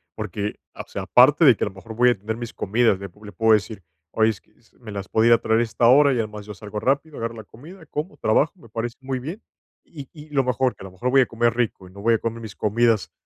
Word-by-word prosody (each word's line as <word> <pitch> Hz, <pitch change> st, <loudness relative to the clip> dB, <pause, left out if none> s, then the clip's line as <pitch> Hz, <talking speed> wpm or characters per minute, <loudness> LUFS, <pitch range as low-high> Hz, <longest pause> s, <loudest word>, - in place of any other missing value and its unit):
porque, 105 Hz, 0 st, -4 dB, 0.2 s
o -, -, -7 dB
sea, -, -, -5 dB
aparte 145 Hz, +6 st, +5 dB
de 130 Hz, -5 st, +7 dB
que -, -, -3 dB
a -, -, 0 dB
lo 100 Hz, -, -7 dB
mejor 110 Hz, +4 st, -10 dB
voy 125 Hz, +2 st, +5 dB
a 120 Hz, -, +1 dB
tener 110 Hz, +3 st, -5 dB
mis 120 Hz, -1 st, -7 dB
comidas, 110 Hz, -1 st, +1 dB
le 100 Hz, -, -6 dB
pu 105 Hz, +4 st, -20 dB
le 105 Hz, -, -9 dB
puedo 110 Hz, +1 st, +3 dB
decir: 105 Hz, -2 st, -1 dB, 0.3 s
"Oye, 110 Hz, 0 st, +3 dB
es 105 Hz, -, -10 dB
que, -, -, -33 dB, 0.3 s
¿me 115 Hz, -3 st, -10 dB
las 100 Hz, -1 st, -6 dB
podría 115 Hz, +1 st, +4 dB
traer 110 Hz, +1 st, +1 dB
a -, -, +3 dB
esta 115 Hz, +1 st, +1 dB
hora?". 140 Hz, +3 st, +6 dB
Y, 130 Hz, -, 0 dB
además, 105 Hz, -2 st, -4 dB
yo 105 Hz, -, -7 dB
salgo 105 Hz, 0 st, -7 dB
rápido, 140 Hz, +5 st, -1 dB
agarro 115 Hz, 0 st, -4 dB
la 110 Hz, -, -9 dB
comida, 160 Hz, -, -14 dB
como, 150 Hz, +4 st, -5 dB
trabajo, 140 Hz, +8 st, +2 dB
me 115 Hz, -, -16 dB
parece 115 Hz, +2 st, -4 dB
muy 130 Hz, -1 st, -3 dB
bien. 165 Hz, -, -7 dB, 0.4 s
Y 140 Hz, -5 st, -11 dB
y, 155 Hz, -1 st, -13 dB
lo 140 Hz, -2 st, +2 dB
mejor, 130 Hz, 0 st, 0 dB
que, -, -, -18 dB
a -, -, -8 dB
lo 95 Hz, -, -10 dB
mejor, 110 Hz, +8 st, -3 dB
voy 135 Hz, 0 st, +6 dB
a -, -, +3 dB
comer 115 Hz, 0 st, 0 dB
rico 115 Hz, -6 st, -2 dB
y -, -, -16 dB
no 100 Hz, -, -11 dB
voy 115 Hz, +2 st, +3 dB
a -, -, +1 dB
comer 115 Hz, +1 st, -4 dB
mis 110 Hz, -3 st, -9 dB
comidas 115 Hz, 0 st, +1 dB
115 Hz, 280 wpm, -23 LUFS, 105-130 Hz, 0.4 s, de